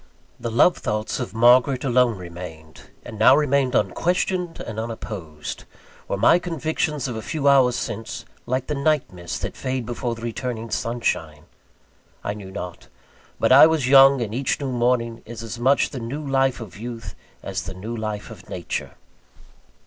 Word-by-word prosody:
The 115 Hz, -, -3 dB
love 120 Hz, +10 st, +4 dB
thoughts 110 Hz, -2 st, -2 dB
of 125 Hz, -3 st, -5 dB
Margaret 125 Hz, +3 st, +5 dB
alone 125 Hz, -4 st, +3 dB
remained, 85 Hz, -3 st, -10 dB, 0.2 s
and 110 Hz, -, -8 dB
now 130 Hz, +4 st, +7 dB
remained 140 Hz, -3 st, +2 dB
unquestioned 180 Hz, 0 st, 0 dB
and 110 Hz, -1 st, -5 dB
unopposed. 100 Hz, -9 st, -6 dB, 0.4 s
Were -, -, -2 dB
my 170 Hz, -, +5 dB
convictions 160 Hz, -4 st, -2 dB
of 125 Hz, -, -4 dB
a 110 Hz, -, -4 dB
few 145 Hz, +5 st, -2 dB
hours 130 Hz, -3 st, +5 dB
since, 115 Hz, +1 st, -5 dB, 0.2 s
like 130 Hz, +1 st, -1 dB
the 150 Hz, -, -3 dB
night 145 Hz, -4 st, +1 dB
mists 85 Hz, -1 st, -5 dB
that -, -, -5 dB
fade 130 Hz, -2 st, -3 dB
before 120 Hz, 0 st, -3 dB
returning 115 Hz, 0 st, -4 dB
sunshine? 80 Hz, -11 st, -2 dB, 0.8 s
I 100 Hz, -, -2 dB
knew 100 Hz, -2 st, -9 dB
not. 90 Hz, -2 st, -7 dB, 0.5 s
But -, -, +2 dB
I 140 Hz, +4 st, +10 dB
was 160 Hz, -5 st, +1 dB
young; 135 Hz, -1 st, +7 dB
and 110 Hz, -1 st, -5 dB
each 130 Hz, +2 st, 0 dB
new 140 Hz, -2 st, -3 dB
morning 120 Hz, -1 st, 0 dB
is 115 Hz, 0 st, -7 dB
as 115 Hz, +1 st, -6 dB
much 135 Hz, +4 st, +3 dB
the 130 Hz, -, -5 dB
new 140 Hz, +6 st, -5 dB
life 135 Hz, -1 st, +2 dB
of 110 Hz, -5 st, -9 dB
youth, 115 Hz, -3 st, -7 dB, 0.3 s
as -, -, -3 dB
the 95 Hz, -, -6 dB
new 110 Hz, +6 st, -5 dB
life 110 Hz, -1 st, -4 dB
of 95 Hz, -5 st, -13 dB
Nature. 90 Hz, -2 st, -4 dB
120 Hz, 165 wpm, -23 LUFS, 110-135 Hz, 0.8 s, I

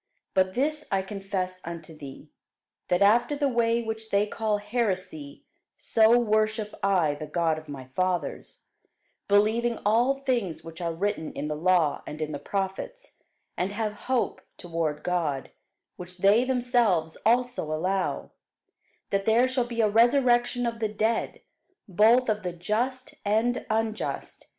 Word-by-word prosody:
But 185 Hz, 0 st, +2 dB
this 300 Hz, +3 st, 0 dB
I 195 Hz, -1 st, +1 dB
confess 190 Hz, -2 st, -4 dB
unto 165 Hz, -1 st, -8 dB
thee, 140 Hz, -3 st, -11 dB, 0.6 s
that 180 Hz, +2 st, +3 dB
after 240 Hz, +7 st, +4 dB
the 285 Hz, 0 st, +1 dB
way 235 Hz, -2 st, +1 dB
which 220 Hz, 0 st, -5 dB
they 200 Hz, 0 st, +2 dB
call 215 Hz, 0 st, -1 dB
heresy, 195 Hz, -, -3 dB, 0.3 s
so 225 Hz, +1 st, +4 dB
worship 215 Hz, -2 st, +1 dB
I 180 Hz, -7 st, +2 dB
the 150 Hz, +1 st, -7 dB
God 160 Hz, 0 st, 0 dB
of 155 Hz, -1 st, -16 dB
my 135 Hz, -3 st, -7 dB
fathers, 180 Hz, -5 st, -2 dB, 0.6 s
believing 220 Hz, +4 st, +2 dB
all 240 Hz, +6 st, +3 dB
things 245 Hz, -11 st, -2 dB
which 165 Hz, +1 st, -10 dB
are 170 Hz, -1 st, -1 dB
written 170 Hz, -1 st, -2 dB
in 150 Hz, -, -4 dB
the 150 Hz, -, -2 dB
law 165 Hz, -2 st, +2 dB
and 150 Hz, -, -7 dB
in 155 Hz, -1 st, -3 dB
the 145 Hz, -, -4 dB
prophets: 195 Hz, -, -4 dB, 0.4 s
and 180 Hz, +2 st, -1 dB
have 215 Hz, 0 st, -2 dB, 0.2 s
hope 255 Hz, -2 st, 0 dB, 0.2 s
toward 165 Hz, -3 st, -3 dB
God, 160 Hz, -7 st, -1 dB, 0.5 s
which 180 Hz, 0 st, -10 dB
they 205 Hz, +6 st, +4 dB
themselves 240 Hz, -10 st, +1 dB
also 245 Hz, -2 st, +2 dB
allow, 185 Hz, +5 st, -1 dB, 0.8 s
that 195 Hz, 0 st, 0 dB
there 230 Hz, +3 st, +4 dB
shall 255 Hz, -1 st, 0 dB
be 235 Hz, -1 st, -1 dB
a 215 Hz, -, +4 dB
resurrection 240 Hz, +2 st, +3 dB
of 230 Hz, -1 st, -3 dB
the 220 Hz, -2 st, 0 dB
dead, 220 Hz, +2 st, -1 dB, 0.5 s
both 220 Hz, +7 st, +4 dB
of 215 Hz, -1 st, 0 dB
the 180 Hz, -2 st, -4 dB
just 235 Hz, +9 st, -2 dB
and 220 Hz, +4 st, 0 dB
unjust. 220 Hz, 0 st, -3 dB
210 Hz, 145 wpm, -27 LUFS, 175-235 Hz, 0.8 s, after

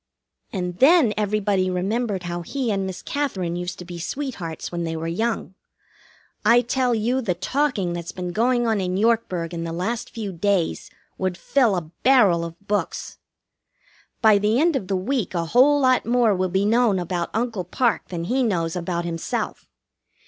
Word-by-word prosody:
And 180 Hz, -4 st, -4 dB
then 290 Hz, -5 st, +6 dB
everybody 205 Hz, -2 st, +1 dB
remembered 195 Hz, +2 st, -1 dB
how 175 Hz, 0 st, -4 dB
he 250 Hz, +6 st, -2 dB
and 195 Hz, -1 st, -1 dB
Miss 190 Hz, -, -7 dB
Katherine 190 Hz, -13 st, -2 dB
used 175 Hz, 0 st, -4 dB
to 180 Hz, -, -9 dB
be 175 Hz, 0 st, -8 dB
sweethearts 180 Hz, -, -5 dB
when 170 Hz, -1 st, -3 dB
they 165 Hz, -1 st, -3 dB
were 160 Hz, 0 st, -4 dB
young. 220 Hz, +3 st, -2 dB, 0.9 s
I 235 Hz, +3 st, +6 dB
tell 250 Hz, 0 st, +1 dB
you, 240 Hz, +4 st, 0 dB
the 190 Hz, -8 st, -1 dB
talking 200 Hz, -, 0 dB
that's 170 Hz, -1 st, -5 dB
been 180 Hz, -1 st, -5 dB
going 240 Hz, +4 st, +2 dB
on 220 Hz, -3 st, +1 dB
in 185 Hz, 0 st, -1 dB
Yorkburg 200 Hz, -6 st, 0 dB
in 165 Hz, -1 st, -3 dB
the 165 Hz, -, -4 dB
last 195 Hz, +8 st, -3 dB
few 210 Hz, -4 st, -5 dB
days 185 Hz, 0 st, 0 dB, 0.3 s
would 185 Hz, -2 st, -1 dB
fill 235 Hz, +2 st, +2 dB
a 160 Hz, -3 st, -4 dB
barrel 210 Hz, -11 st, +5 dB
of 170 Hz, 0 st, -7 dB
books. 205 Hz, 0 st, -2 dB, 1.0 s
By 215 Hz, -2 st, +6 dB
the 210 Hz, +4 st, +2 dB
end 330 Hz, 0 st, +3 dB
of 200 Hz, -8 st, -2 dB
the 195 Hz, -, 0 dB
week 215 Hz, 0 st, -2 dB
a 170 Hz, -1 st, 0 dB
whole 265 Hz, -, +5 dB
lot 255 Hz, -2 st, +3 dB
more 235 Hz, -2 st, +3 dB
will 185 Hz, 0 st, 0 dB
be 190 Hz, +2 st, +1 dB
known 225 Hz, -2 st, +3 dB
about 175 Hz, -1 st, -2 dB
Uncle 225 Hz, -4 st, -2 dB
Parke 235 Hz, +7 st, 0 dB
than 170 Hz, -2 st, -4 dB
he 250 Hz, +9 st, 0 dB
knows 170 Hz, -8 st, 0 dB
about 175 Hz, -1 st, -2 dB
himself. 165 Hz, -1 st, -3 dB
195 Hz, 180 wpm, -23 LUFS, 175-240 Hz, 1.0 s, then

